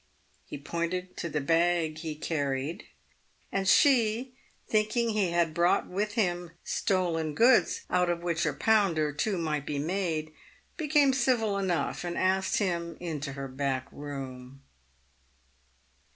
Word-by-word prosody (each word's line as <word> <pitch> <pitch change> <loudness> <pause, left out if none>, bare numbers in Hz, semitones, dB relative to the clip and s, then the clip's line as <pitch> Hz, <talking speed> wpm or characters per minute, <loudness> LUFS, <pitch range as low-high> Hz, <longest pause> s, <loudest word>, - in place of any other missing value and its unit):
He - - -6
pointed 170 +5 -3
to 170 - -3
the 150 - -1
bag 165 +1 +1
he 155 -2 -5
carried, 145 -1 -2 0.7
and 195 -1 -1
she, 245 -1 +4 0.3
thinking 215 +2 +1
he 210 -4 +1
had 170 -2 +1
brought 170 +2 +2
with 210 +3 -2
him 175 -6 -1
stolen 165 -5 0
goods 245 +2 +4
out 180 -1 +1
of 170 0 -2
which 170 -1 0
a - - 0
pound 205 -7 +2
or 150 -1 0
two 195 +6 -1
might 150 -4 -2
be 145 - -2
made, 160 -1 -2 0.4
became 295 -4 +3
civil 235 -5 +1
enough, 190 -4 -1
and 175 -1 -4
asked 190 +1 +1
him 170 -4 -1
into 155 -5 -4
her 135 0 -5
back 130 -1 -2
room. 135 -2 -8
175 Hz, 135 wpm, -29 LUFS, 155-200 Hz, 0.7 s, she